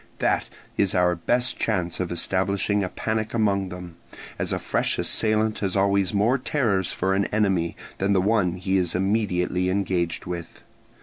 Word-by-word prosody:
That - - 0 0.3
is 100 -2 +2
our 90 -1 +4
best 120 +9 -1
chance 90 -6 -1
of 90 -2 -2
establishing 95 +3 0
a 90 - -2
panic 110 +2 -2
among 100 -4 +1
them, 90 -2 -9 0.4
as - - -2
a - - +1
fresh - - 0
assailant 110 0 +1
has 95 -3 -1
always 100 -1 +2
more 110 +6 +2
terrors 110 - 0
for 95 +1 0
an 100 0 +2
enemy 95 -6 0 0.2
than 100 +1 +2
the 95 - +4
one 100 -3 +2
he 95 +1 0
is 90 -2 0
immediately 90 -2 +1
engaged 90 -3 -1
with. 85 -1 -7
95 Hz, 165 wpm, -24 LUFS, 90-105 Hz, 0.4 s, our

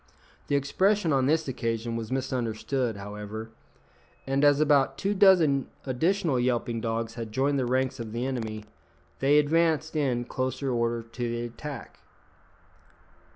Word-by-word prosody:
The 145 - +1
expression 175 +5 +2
on 135 -1 +2
this 160 +1 +2
occasion 115 -2 -2
was 115 +1 -5
misunderstood, 125 -2 -1
however; 105 +2 -7 0.7
and 135 +1 0
as 145 -1 +5
about 145 -3 +3
two 200 +1 0
dozen 170 -9 +5 0.2
additional 160 +2 +1
yelping 120 -2 0
dogs 115 0 -2
had 115 -2 -6
joined 140 +4 +1
the 125 - 0
ranks 130 +1 0
of 115 -2 -5
the 120 +3 -2
enemy, 110 -5 -4 0.5
they 140 +2 +4
advanced 160 +1 +2
in 130 -5 0
close 130 +2 -3
order 120 -3 0
to 120 +1 -4
the 120 0 -2
attack. 140 +5 -8
130 Hz, 140 wpm, -27 LUFS, 115-145 Hz, 0.7 s, as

